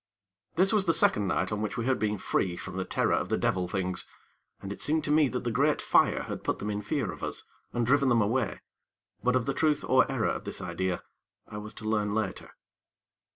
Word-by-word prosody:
This 190 +5 +3
was 205 -3 +3
the 165 - +3
second 105 -9 +3
night 95 +2 0
on 105 0 -2
which 105 -2 -3
we 115 - -1
had 130 -2 +1
been 105 0 0
free 90 -1 0
from - - -7
the 95 -1 -2
terror - - +1
of - - 0
the - - +1
devil 90 -1 0
things, 90 -1 -2 0.5
and 100 +1 -5
it - - -12
seemed 155 +1 +1
to 150 - -1
me 150 -1 +5
that 125 0 -3
the 120 - -1
great 145 +6 +2
fire - - +3
had - - -6
put - - 0
them 105 - -3
in 105 0 -2
fear 105 - -1
of - - -10
us - - -3 0.3
and 120 -1 0
driven 140 +2 +3
them 120 -1 +4
away; 115 +3 0 0.6
but 125 +1 +3
of 125 -3 +1
the 140 - 0
truth 150 0 +1
or 130 0 +4
error 130 -5 +1
of - - -3
this - - -4
idea, 95 -2 -2 0.4
I 105 - -7
was 105 +1 -8
to 110 - -9
learn 105 -1 0
later. 105 -4 -2
110 Hz, 235 wpm, -29 LUFS, 100-135 Hz, 0.6 s, me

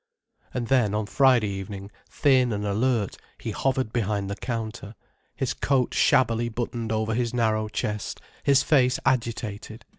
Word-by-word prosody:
And 125 -2 -2
then, 120 -6 +2
on 105 0 0
Friday 125 -2 +3
evening, 100 +1 -6 0.2
thin 130 -4 +3
and 105 -1 -2
alert 110 0 0 0.2
he - - -5
hovered 130 -4 -1
behind 100 -3 -1
the - - -2
counter, 110 -2 -5 0.4
his - - -1
coat 135 -3 +1
shabbily 120 -2 +3
buttoned 115 -1 -3
over 110 0 0
his 120 +1 -1
narrow 110 -2 +1
chest, 105 -1 -3 0.2
his 140 -1 +4
face 130 -4 +3
agitated. 115 -4 -2
115 Hz, 145 wpm, -25 LUFS, 105-125 Hz, 0.4 s, his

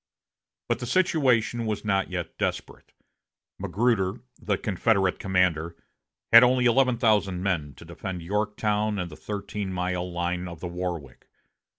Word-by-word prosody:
But - - 0
the 120 - -5
situation 125 -9 +2
was 105 -1 -3
not 95 -2 +1
yet 90 -3 -5
desperate. - - -4 0.7
Magruder, 110 -2 0 0.2
the 105 -2 0
Confederate 95 -1 +1
commander, 90 -3 +1 0.6
had 115 - +12
only 125 0 +3
eleven 125 0 +3
thousand 105 -6 +2
men 80 -8 -1
to 85 - -13
defend 90 +1 -6
Yorktown 105 +2 -1
and 90 -3 -4
the - - -9
thirteen 100 0 -5
mile 90 0 -2
line 90 +1 -2
of 85 -2 -9
the 90 - -5
Warwick. 85 -7 -5
95 Hz, 135 wpm, -26 LUFS, 90-110 Hz, 0.7 s, had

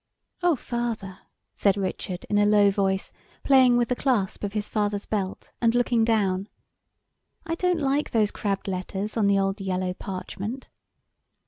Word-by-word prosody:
"Oh, 350 -2 +3
father!" 230 -6 -4 0.3
said 200 -1 +2
Richard, 185 -1 -4
in 205 - +2
a 205 - +4
low 205 -1 +5
voice, 195 -1 -1 0.3
playing 260 -3 +5
with 240 -1 +1
the 250 - +1
clasp 235 -9 0
of 200 -1 -3
his 210 -1 -2
father's 205 -1 -1
belt, 195 -3 -3
and 230 0 +3
looking 240 -1 +3
down, 200 -3 +1 1.0
"I 330 - -2
don't 360 0 +1
like 280 +1 0
those 215 -3 +2
crabbed 200 -2 -2
letters 195 +2 -3
on 215 -3 +2
the 200 0 +4
old 195 +1 0
yellow 185 -1 -1
parchment." 200 +6 -6
205 Hz, 155 wpm, -25 LUFS, 195-240 Hz, 1.0 s, low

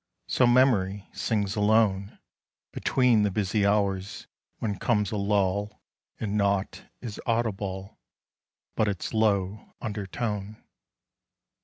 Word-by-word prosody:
So 125 - +3
memory 105 -6 +3
sings 105 -3 -1
alone 105 -2 +2 0.5
Between 125 -4 +3
the 105 - +2
busy 100 +1 +1
hours 100 -2 0 0.3
when 100 -4 -3
comes 105 -4 +1
a - - -2
lull, 100 0 0 0.4
And 105 -1 -2
naught 100 -1 0 0.2
is 115 -4 -6
audible 100 -5 -2 0.8
But 110 - +2
its 100 -3 -3
low 105 -2 0
undertone. 105 0 -4
105 Hz, 105 wpm, -27 LUFS, 100-110 Hz, 0.8 s, So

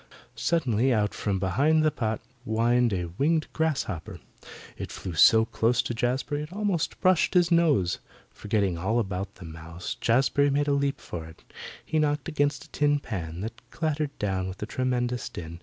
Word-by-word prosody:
Suddenly 130 -7 +1
out 105 -3 +1
from 100 -2 -1
behind 140 - +2
the 155 - +4
pot 110 -5 -2 0.2
whined 120 +1 +2
a 90 -3 -2
winged 155 +2 +2
grasshopper. 140 - -2 0.6
It - - -6
flew 90 - -6
so 110 +8 +6
close 115 +2 +1
to - - -3
Jazbury 130 +5 -1
it 150 +2 -7
almost 200 -4 -1
brushed 185 0 +3
his 175 -1 +4
nose. 150 - +3 0.3
Forgetting 100 -5 -1
all 110 +7 0
about 100 -3 -2
the 90 - -11
mouse, 80 +2 -7
Jazbury 135 +4 +2
made 145 +1 +1
a - - +2
leap 140 0 0
for 80 -2 -7
it. 80 - -15 0.4
He 155 - 0
knocked 150 -2 0
against 145 -4 0
a - - -22
tin 145 0 +2
pan 85 - -5
that 115 +2 -6
clattered 155 -2 -2
down 95 -2 -1
with 95 +2 -6
a - - -1
tremendous 125 0 -1
din. 85 0 -8
120 Hz, 175 wpm, -27 LUFS, 95-145 Hz, 0.6 s, so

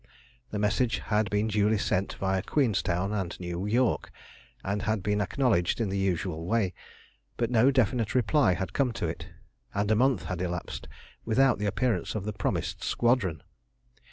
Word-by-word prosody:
The 105 - -4
message 105 +4 +1
had 105 -1 0
been 105 +1 +1
duly 105 0 +2
sent 95 -1 -1
viâ 95 -1 0
Queenstown 100 - 0
and 95 -5 -3
New 90 +2 -4
York, 120 +3 +1 0.5
and 100 +2 -1
had 110 -3 -1
been 105 +1 +1
acknowledged 105 - +1
in 110 -4 0
the 95 - -1
usual 90 -3 -1
way, 105 -4 +1 0.6
but 120 0 0
no 120 +2 +5
definite 125 -3 +1
reply 125 - +3
had 95 0 -4
come 130 -4 +1
to 120 -6 -3
it, 80 - -4 0.5
and 100 +1 +1
a - - +5
month 125 -2 +2
had 90 -2 -4
elapsed 90 -1 -4 0.4
without 125 +1 +3
the 105 - 0
appearance 115 +5 0
of 105 -2 -3
the 105 - -3
promised 105 - -2
squadron. 115 - +1
105 Hz, 165 wpm, -28 LUFS, 95-115 Hz, 0.6 s, no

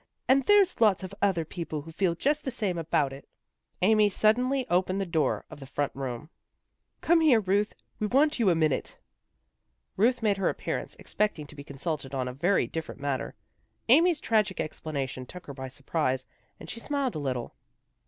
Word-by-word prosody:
And 270 +1 +5
there's 405 - +4
lots 205 -4 +4
of 185 - -7
other 185 -5 +2
people 155 -2 -5
who 165 - -10
feel 170 0 0
just 295 - 0
the - - -2
same 205 -8 -2
about 150 -4 0
it." 135 - -12 0.6
Amy 210 +1 +5
suddenly 250 +6 +2
opened 185 +2 +1
the 195 - -1
door 160 -6 0
of - - -10
the 135 - -10
front 145 +1 -1
room. 135 +3 -5 0.3
" - - -51
Come 335 0 +4
here, 285 -8 +6
Ruth, 205 +1 0 0.2
we 215 - 0
want 280 +5 +3
you 220 -5 +4
a 175 - +3
minute." 155 -3 0 1.0
Ruth 235 +4 +2
made 205 -2 +2
her 195 - +1
appearance, - - -4
expecting 210 -8 -2
to 145 - -13
be 140 - -9
consulted 140 -1 -4
on 130 -1 -1
a 125 - -4
very 175 +9 +2
different 160 -3 -6
matter. 140 -2 -3 0.5
Amy's 325 +5 +5
tragic 215 - +1
explanation 140 -4 -4
took 180 +5 -10
her 140 - -7
by 130 -1 -6
surprise, 130 -1 -2 0.3
and - - -10
she 230 - -6
smiled 280 0 -1
a - - -4
little. 130 -4 -3
180 Hz, 185 wpm, -28 LUFS, 145-225 Hz, 1.0 s, here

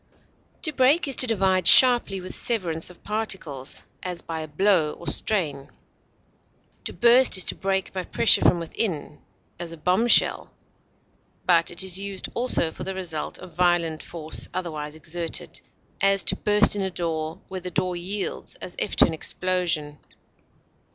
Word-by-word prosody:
To 310 - -1
break 275 +5 +3
is 270 - +1
to 255 - +7
divide 190 -5 +1
sharply, 240 -6 +7
with 185 - -8
severance 175 -9 +2
of 180 - -16
particles, 190 -11 -3 0.2
as 180 -2 -6
by 165 -1 -6
a 155 - -6
blow 160 -1 +1
or 170 - -13
strain. 150 -4 -1 1.2
To - - -3
burst 240 -2 +5
is 185 - +2
to - - 0
break 190 -1 -3
by 185 -1 -4
pressure 230 -3 +4
from 180 - +3
within, 165 -3 -4 0.4
as 170 -1 -6
a 165 - -9
bombshell, 185 +9 +3 0.9
but 170 -2 +2
it 170 +1 -2
is 190 0 -1
used 200 -1 -5
also 235 -9 0
for - - -9
the 190 +1 -5
result 165 -5 -5
of 185 -1 -13
violent 175 -2 0
force 160 -2 -5
otherwise 155 -4 -5
exerted; 165 +2 -5 0.4
as, 195 0 +2
to - - +1
burst 210 0 +2
in 205 - -3
a 190 - -2
door, 160 -3 -4
where 185 -1 -7
the 180 - -6
door 180 +1 -2
yields 190 +3 -4
as 180 - -10
if - - -2
to - - +6
an 165 - -3
explosion. 165 -3 -1
180 Hz, 160 wpm, -23 LUFS, 165-195 Hz, 1.2 s, to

